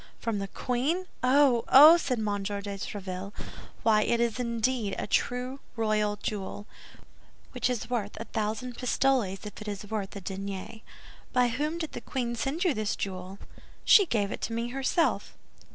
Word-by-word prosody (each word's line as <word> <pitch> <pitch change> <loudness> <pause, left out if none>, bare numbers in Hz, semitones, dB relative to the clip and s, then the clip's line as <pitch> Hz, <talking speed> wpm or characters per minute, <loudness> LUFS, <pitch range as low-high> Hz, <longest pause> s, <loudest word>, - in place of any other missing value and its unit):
"From 225 -3 -2
the 195 - -3
queen! 270 - -1 0.2
Oh, 255 -2 +4
oh!" 300 +5 +10
said 280 -7 -1
M. 220 - -2 0.2
de 205 +1 -3
Tréville. 195 -1 -5 0.5
"Why, 215 -1 +4
it 235 +2 +1
is 235 0 0
indeed 235 -3 0
a - - -2
true 250 +5 -1 0.2
royal 215 -2 +1
jewel, 205 0 -5 0.9
which 250 -1 0
is 245 -3 -2
worth 220 -5 -3
a - - -3
thousand 220 +3 -3
pistoles 250 -6 +1
if 210 - -8
it 210 - -8
is 205 0 -6
worth 210 -3 -3
a 200 - -6
denier. 195 +3 -6 0.5
By 250 -1 +4
whom 300 +7 -2
did 320 -2 -4
the - - -6
queen 240 -3 -3
send 270 +9 -1
you 355 -5 +3
this 215 -3 -1
jewel?" 185 0 -5 0.5
"She 400 -4 +7
gave 205 -7 0
it - - -5
to 230 - -3
me 230 +1 -2
herself." 270 +6 0
230 Hz, 170 wpm, -28 LUFS, 205-255 Hz, 0.9 s, oh